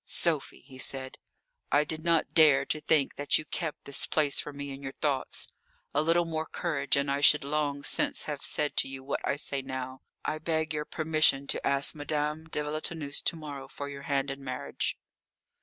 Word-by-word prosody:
"Sophie," 160 -5 +1
he 130 -1 -14
said, 130 0 -3 0.5
"I 145 - +5
did 155 +1 -4
not 170 -2 +2
dare 145 -4 +6
to 155 - -2
think 150 -2 +2
that 145 - +2
you 155 - -4
kept 160 -2 -4
this 140 - +1
place 150 -3 +1
for 150 - -4
me 140 0 -6
in 135 0 -8
your 135 -1 -6
thoughts. 140 -3 -1 0.5
A 145 - +3
little 165 +2 +3
more 160 -1 -2
courage 140 -5 0
and 140 0 +1
I 140 +1 0
should 150 0 +7
long 145 0 -1
since - - +2
have 150 -2 -4
said 150 - +1
to - - +3
you 135 0 -6
what 140 - -2
I - - +1
say 140 -1 -1
now. 130 0 -6 0.2
I 155 - -1
beg 160 0 -1
your 150 0 -2
permission 155 -4 +3
to - - -1
ask 140 0 +3
Madame 150 +1 -2
de 150 - -2
Villetaneuse 150 -1 -2
to - - +1
morrow 145 -4 -7
for 140 +1 -6
your 140 0 -7
hand 140 -1 +1
in 135 0 -7
marriage." 130 -1 -3
145 Hz, 200 wpm, -29 LUFS, 140-155 Hz, 0.5 s, should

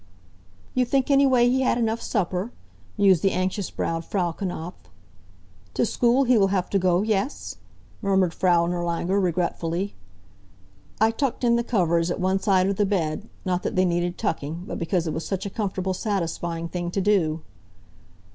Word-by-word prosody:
"You 255 - +2
think 265 +2 +1
anyway 265 -3 +5
he 260 +2 +2
had 255 - +2
enough 230 -1 0
supper? 190 +1 -1 0.5
mused 190 -5 +4
the 195 - +3
anxious 185 +1 -1
browed 165 0 -2
Frau 175 -1 -1
Knapf. 175 -1 -5 1.0
"To - - +2
school 245 +4 +2
he 250 -3 +4
will 195 - +4
have 190 -2 -1
to 195 - +2
go, 180 0 +2
yes?" 215 +5 -2 0.4
murmured 190 -4 +2
Frau 175 -1 +3
Nirlanger, 175 +2 -1
regretfully. 175 +1 -1 1.1
I 220 +1 +4
tucked 260 +1 -2
in 235 -1 +4
the 235 - +1
covers 170 -7 +1
at 175 - -2
one 190 +1 +1
side 190 -2 +3
of 200 -1 -1
the 205 - +3
bed, 185 0 -1 0.2
not 180 -1 0
that - - -3
they 185 0 +3
needed 175 0 -1
tucking, 165 -4 -3
but - - -5
because 170 0 0
it 160 - -2
was 160 - -3
such 195 0 -3
a 200 - -4
comfortable, 190 -3 -2
satisfying 170 -4 -2
thing 175 0 -4
to 185 - -2
do. 175 -6 +2
190 Hz, 170 wpm, -24 LUFS, 175-210 Hz, 1.1 s, anyway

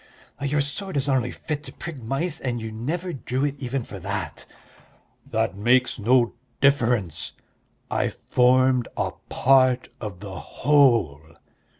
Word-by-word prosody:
"Your 145 +1 +1
sword 150 +5 -3
is 140 0 0
only 130 -3 +2
fit 150 +2 -4
to - - -8
prick 160 -6 -7
mice, 135 +8 -2
and 120 -2 -2
you 110 -1 -5
never 165 +11 -3
drew 130 +1 -2
it 145 -1 -3
even 130 -1 -2
for 100 - -9
that." 95 -2 -5 0.8
"That - - 0
makes 125 +5 +2
no 120 +2 +3 0.3
difference; 120 - +2 0.6
I - - +1
formed 125 0 +3
a - - 0 0.2
part 130 -1 +4
of 105 -6 -6
the 100 -2 -7
whole." 120 - +3
130 Hz, 135 wpm, -24 LUFS, 115-140 Hz, 0.8 s, part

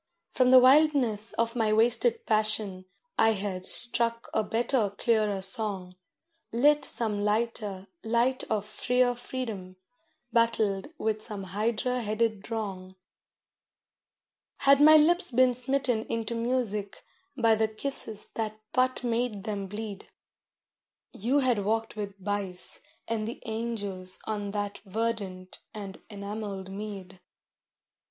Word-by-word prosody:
From 255 -1 +3
the 260 - +8
wildness 255 -5 +4
of 230 +1 -1
my 220 -3 +1
wasted 245 - +2
passion 215 -3 +1 0.3
I 225 0 +5
had 190 -2 -2
struck 235 -1 +3
a 220 - +1
better, 230 0 0
clearer 210 -2 0
song, 195 -3 -1 0.6
Lit 290 +6 +3
some 215 -3 +1
lighter 210 -3 -1 0.2
light 235 +3 +1
of 210 -2 -2
freer 245 +3 +1
freedom, 225 -7 -6 0.6
battled 220 -4 +1
with 215 -4 -1
some 210 -3 -3
Hydra 220 +6 -1
headed 215 -1 -1
wrong. 195 -5 -5 1.7
Had 275 0 +5
my 310 +1 +9
lips 345 +5 +5
been 255 0 +4
smitten 250 -2 0
into 230 0 -3
music 230 -4 -2 0.3
by 230 -3 +4
the 220 0 +2
kisses 220 -2 -1
that 215 -1 -4
but 255 0 +1
made 230 -4 -1
them 200 -3 -4
bleed, 210 0 -7 1.1
You 255 +8 +1
had 245 -6 +2
walked 225 +3 -1
with 205 -2 -5
Bice 195 -2 -2 0.3
and 220 -1 -2
the 235 - -6
angels 205 -5 -3
on 205 -2 -3
that 205 0 -4
verdant 200 -3 -4 0.2
and 200 -2 -8
enamelled 200 -2 -6
mead. 195 -2 -8
220 Hz, 120 wpm, -28 LUFS, 205-240 Hz, 1.7 s, my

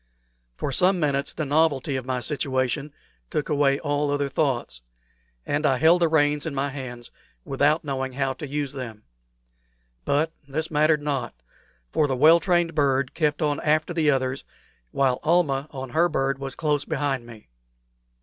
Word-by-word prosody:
For 140 - -3
some 180 +7 +3
minutes 140 -3 0
the 155 - -4
novelty 145 -2 +1
of 130 -1 -4
my 130 -1 -1
situation 140 0 -1 0.4
took 150 - -2
away 140 -2 +3
all 145 -1 -1
other 145 0 0
thoughts, 125 - -1 0.6
and 145 +1 -1
I 135 -3 +3
held 165 +5 +4
the 170 - +5
reins 150 -1 +2
in 150 - -4
my 140 +1 -1
hands 125 -3 -7 0.3
without 145 +4 +2
knowing 135 -2 -3
how 135 0 -1
to 150 - -7
use 145 0 -3
them. 115 -6 -7 1.0
But 155 - +1 0.2
this 155 +4 -3
mattered 150 0 +3
not, 135 - -2 0.6
for 150 - +2
the 135 - -1
well 160 +6 +6
trained 175 -1 +1
bird 140 -3 +1
kept 150 0 0
on 145 -1 0
after 155 +3 +1
the 160 -3 +2
others, 130 -1 0 0.5
while 130 - +1
Almah 155 -4 +1
on 130 -2 -7
her 170 +4 +3
bird 135 -2 -1
was 135 0 -4
close 150 -2 0
behind 140 -6 -2
me. 110 - -14
145 Hz, 165 wpm, -24 LUFS, 135-155 Hz, 1.0 s, well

